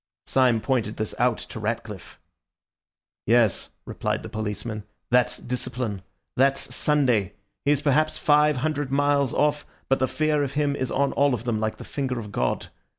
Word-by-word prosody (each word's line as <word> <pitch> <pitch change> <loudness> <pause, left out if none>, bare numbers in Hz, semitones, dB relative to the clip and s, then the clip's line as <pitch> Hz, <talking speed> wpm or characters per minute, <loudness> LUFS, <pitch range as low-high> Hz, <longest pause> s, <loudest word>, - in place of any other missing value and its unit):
Syme 125 -4 +3
pointed 115 -5 -1
this 110 -1 -3
out 125 -1 +3
to - - -8
Ratcliffe. 110 -3 -5 1.1
"Yes," 115 -4 +3 0.2
replied - - -2
the - - -7
policeman, 110 0 -4 0.3
"that's 125 0 +3
discipline. 125 -4 -4 0.3
That's 135 +1 +2
Sunday. 125 -10 +2 0.3
He - - +2
is 145 - -1
perhaps 155 +1 +2
five 150 -1 +4
hundred 145 -3 -1
miles 140 -1 +2
off, 150 0 +1 0.3
but 135 - +3
the 130 - +2
fear 155 0 +1
of 140 -1 -3
him 145 -1 +1
is 130 -2 -2
on 140 +1 +1
all 140 -2 +3
of 115 - -7
them, 120 -3 -1
like 110 0 -2
the - - -9
finger 130 -3 -3
of 105 -3 -6
God. - - -1
130 Hz, 165 wpm, -25 LUFS, 110-145 Hz, 1.1 s, five